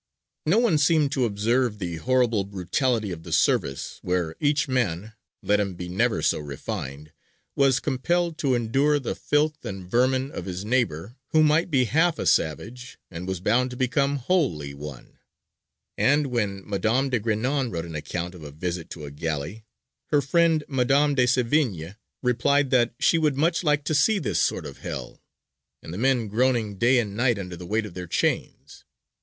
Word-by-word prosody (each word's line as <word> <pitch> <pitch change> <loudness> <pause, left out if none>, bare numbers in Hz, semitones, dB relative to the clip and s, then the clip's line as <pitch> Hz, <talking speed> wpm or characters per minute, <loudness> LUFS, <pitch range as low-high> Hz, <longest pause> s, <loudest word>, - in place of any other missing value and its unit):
No 175 +7 +4
one 230 -10 +3
seemed 150 -1 +3
to 130 -3 +1
observe 115 +2 0
the 85 -4 -4
horrible 120 -1 +2
brutality 100 +4 -1
of 85 -2 -6
the - - -10
service, 70 0 0
where 90 -3 -1
each 145 0 +1
man, 110 -5 -1 0.3
let 105 0 +2
him 100 -3 -2
be 90 0 -6
never 110 +7 0
so - - +2
refined, 70 0 -6 0.4
was 135 -2 +3
compelled 165 +6 0
to 135 -5 +2
endure 135 +6 +2
the 135 - -3
filth 150 +1 0
and 95 -2 -6
vermin 130 +5 +1
of 90 - -6
his 95 +1 -5
neighbour 115 - -1 0.2
who 155 0 +5
might 155 +3 +3
be 135 -5 +3
half 160 +9 +2
a - - -3
savage 115 - -1
and 85 +2 -7
was 95 -2 -2
bound 120 +7 +2
to 125 - -8
become 140 +2 +1
wholly 130 - 0
one; 70 -2 -10 0.8
and 145 +2 +3
when 100 -5 -2
Madame 115 +7 0
de 120 - +1
Grignan 120 +5 0
wrote 85 -3 -4
an 85 - -8
account 85 +4 -4
of 90 - -12
a 75 - -8
visit 85 +3 -5
to 75 -3 -8
a 70 - -8
galley, 80 +8 -4 0.4
her 145 - +3
friend 160 +2 +2
Madame 140 +2 +2
de 130 -2 +3
Sévigné 120 - 0 0.3
replied 130 +3 +2
that 120 -2 +3
she 165 - +3
would 150 -4 +1
"much 165 +3 +1
like 150 -2 +2
to 155 - -1
see 205 +8 +3
this 185 - -1
sort - - 0
of - - -9
Hell," - - -7 0.6
and 80 - -8
the - - -5
men 125 -2 +2
"groaning 110 -2 0
day 125 +2 +4
and 105 -4 -1
night 120 0 +2
under 90 -3 -6
the 85 +1 -9
weight 110 +3 0
of 100 - -9
their 90 0 -7
chains." - - -2
120 Hz, 180 wpm, -25 LUFS, 90-140 Hz, 0.8 s, who